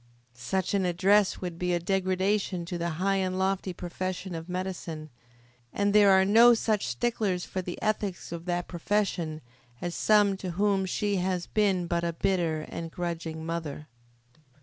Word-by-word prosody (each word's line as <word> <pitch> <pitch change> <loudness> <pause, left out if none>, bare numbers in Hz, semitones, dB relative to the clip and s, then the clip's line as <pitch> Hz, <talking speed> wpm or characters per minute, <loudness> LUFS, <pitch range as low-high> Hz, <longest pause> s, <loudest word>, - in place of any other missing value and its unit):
Such 140 +13 -2
an 200 -1 +2
address 190 +3 +3
would 175 -2 -5
be 180 -1 +1
a - - 0
degradation 190 0 0
to 175 -1 -4
the 170 0 -1
high 195 +2 +1
and 185 -1 -1
lofty 190 0 0
profession 180 +1 -5
of 165 +1 -6
Medicine, 180 -4 -5 0.6
and 200 0 +1
there 205 -1 +7
are 190 0 +6
no 230 +4 +7
such 215 - 0
sticklers 185 - -1
for 185 - -3
the 175 -1 -6
ethics 210 -5 -2
of 170 0 -6
that 175 -1 -2
profession 175 -4 -1 0.4
as 175 -1 -3
some 205 -1 +3
to 185 -2 -5
whom 200 -2 +2
she 205 +2 0
has 180 -1 -1
been 195 -4 +1
but 170 0 -1
a 170 -1 -1
bitter 165 -3 0
and 165 +2 -6
a - - -10
grudging 165 -2 -4
mother. 160 -3 -4
185 Hz, 170 wpm, -28 LUFS, 170-195 Hz, 0.6 s, there